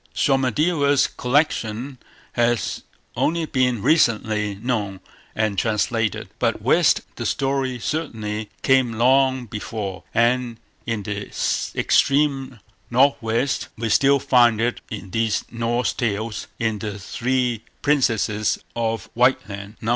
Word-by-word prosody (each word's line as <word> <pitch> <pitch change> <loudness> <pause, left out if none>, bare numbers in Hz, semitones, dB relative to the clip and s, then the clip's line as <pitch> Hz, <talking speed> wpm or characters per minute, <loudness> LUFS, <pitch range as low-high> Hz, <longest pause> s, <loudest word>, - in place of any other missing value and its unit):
Somadeva's 140 +2 +2
collection 125 -2 -1 0.3
has 120 -1 0 0.3
only 165 +1 0
been 125 -6 0
recently 110 -8 +2
known 105 -3 -2 0.4
and 105 -3 0
translated. 115 -1 0
But - - +1
west - - +3 0.2
the - - -4
story 135 -2 -1
certainly 110 -7 -3
came 130 -3 +3
long 130 +2 +3
before, 105 -4 -5
and 120 0 +1 0.3
in 115 -3 -2
the 105 0 -4 0.5
extreme 135 -3 +2 0.3
north 135 +4 +4
west 115 +5 -1
we 115 0 -2
still 140 +5 +4
find 120 -4 +4
it 120 +1 -1
in 100 -4 -7
these 115 0 0
Norse 120 +1 0
Tales 110 -2 -2
in 110 -2 -1
"The 105 0 -5
Three 120 +2 -1 0.2
Princesses 115 -7 +1 0.2
of 115 -1 -2
Whiteland", 105 -4 0
No. 115 - -3
120 Hz, 115 wpm, -22 LUFS, 110-130 Hz, 0.5 s, north